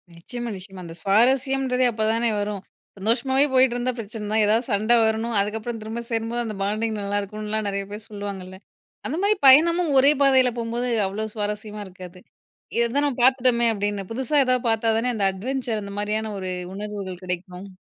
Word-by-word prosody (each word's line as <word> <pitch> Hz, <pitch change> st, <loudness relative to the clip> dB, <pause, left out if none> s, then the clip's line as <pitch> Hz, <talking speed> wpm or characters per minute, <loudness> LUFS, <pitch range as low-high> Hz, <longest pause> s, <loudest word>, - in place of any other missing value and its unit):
நிச்சயமா 240 Hz, +8 st, -6 dB
நிச்சயமா. 190 Hz, 0 st, -10 dB
அந்த 165 Hz, 0 st, -9 dB
சுவாரஸ்யம்ன்றது 255 Hz, +4 st, +2 dB
அப்போதானே 225 Hz, +2 st, 0 dB
வரும். 205 Hz, -1 st, -3 dB, 0.4 s
சந்தோஷமாவே 255 Hz, +7 st, +2 dB
போயிட்டுருந்தா 255 Hz, -1 st, +3 dB
பிரச்சனை 220 Hz, -1 st, -7 dB
தான் 215 Hz, 0 st, +3 dB
எதாவது 225 Hz, +4 st, +2 dB
சண்டை 215 Hz, +4 st, +3 dB
வரணும், 220 Hz, +1 st, -1 dB
அதுக்கப்புறம் 220 Hz, +3 st, -2 dB
திரும்ப 220 Hz, +2 st, -5 dB
சேரும்போது 230 Hz, +1 st, -1 dB
அந்த 215 Hz, -2 st, -5 dB
பாண்டிங் 215 Hz, +2 st, -1 dB
நல்லாயிருக்குனுலாம் 210 Hz, +1 st, -2 dB
நிறைய 200 Hz, 0 st, -2 dB
பேர் 210 Hz, 0 st, -8 dB
சொல்லுவாங்கல்ல. 200 Hz, -3 st, -7 dB, 0.5 s
அந்த 305 Hz, -, -3 dB
மாதிரி 420 Hz, +1 st, +3 dB
பயணமும் 335 Hz, +4 st, +6 dB
ஒரே 275 Hz, +2 st, +6 dB
பாதையில 265 Hz, -2 st, +5 dB
போகும்போது, 235 Hz, +1 st, -2 dB, 0.2 s
அவ்ளோ 210 Hz, +3 st, -4 dB
சுவாரஸ்யமா 210 Hz, 0 st, -4 dB
இருக்காது. 180 Hz, -1 st, -12 dB, 0.6 s
"இத 235 Hz, 0 st, +2 dB
தான் 290 Hz, -, +3 dB
நம்ம 275 Hz, -4 st, -3 dB
பார்த்துட்டோமே," 250 Hz, -2 st, +4 dB
அப்டின்னு 205 Hz, -2 st, -3 dB
புதுசா 265 Hz, +5 st, -1 dB
ஏதாவது 255 Hz, -1 st, +1 dB
பார்த்தா 225 Hz, 0 st, +1 dB
தானே, 245 Hz, +2 st, 0 dB
அந்த 200 Hz, -2 st, +1 dB
அட்வென்ச்சர் 230 Hz, +2 st, -3 dB
அந்த 200 Hz, 0 st, -8 dB
மாதிரியான 215 Hz, +1 st, -2 dB
ஒரு 185 Hz, -1 st, -4 dB, 0.2 s
உணர்வுகள் 200 Hz, -3 st, -6 dB
கிடைக்கும். 180 Hz, +1 st, -5 dB
220 Hz, 160 wpm, -23 LUFS, 205-245 Hz, 0.6 s, பயணமும்